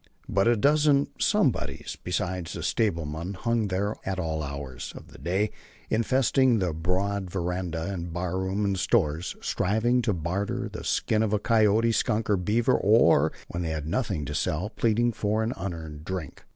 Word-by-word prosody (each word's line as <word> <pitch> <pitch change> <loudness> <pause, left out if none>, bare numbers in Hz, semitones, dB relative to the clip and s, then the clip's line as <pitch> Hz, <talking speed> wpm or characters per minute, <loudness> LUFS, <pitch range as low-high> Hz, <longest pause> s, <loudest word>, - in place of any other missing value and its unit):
But 95 +2 +2
a 120 - +5
dozen 145 +4 +3
"somebodies" - - 0
besides 90 -1 -2
the - - -5
stablemen 85 -3 -1
hung 115 +2 0
there 100 +2 -1
at 95 0 -2
all 80 -4 -2
hours 70 -3 -6
of - - -12
the - - -14
day, 95 +5 0 0.4
infesting 130 +2 +3
the 90 -5 0
broad 95 +4 -1
veranda, 90 0 -2
the 85 -1 -4
barroom 95 +4 -2
and 100 -2 0
stores, 80 +1 +1
striving 115 +6 +1
to 115 - +1
barter 90 +4 -2
the - - -8
skin 110 -1 +1
of 105 -1 +2
coyote, 115 0 +4
skunk 110 0 0
or 100 - +4
beaver, 105 +6 +2
or, 85 -7 +4 0.2
when 85 - -3
they 85 - -2
had 80 -2 -3
nothing 85 - -1
to - - -4
sell, 90 +8 -1
pleading 120 +1 +2
for 110 0 0
an 115 +3 -1
unearned 80 -5 -6
drink. 90 -4 -6
95 Hz, 165 wpm, -27 LUFS, 85-110 Hz, 0.4 s, a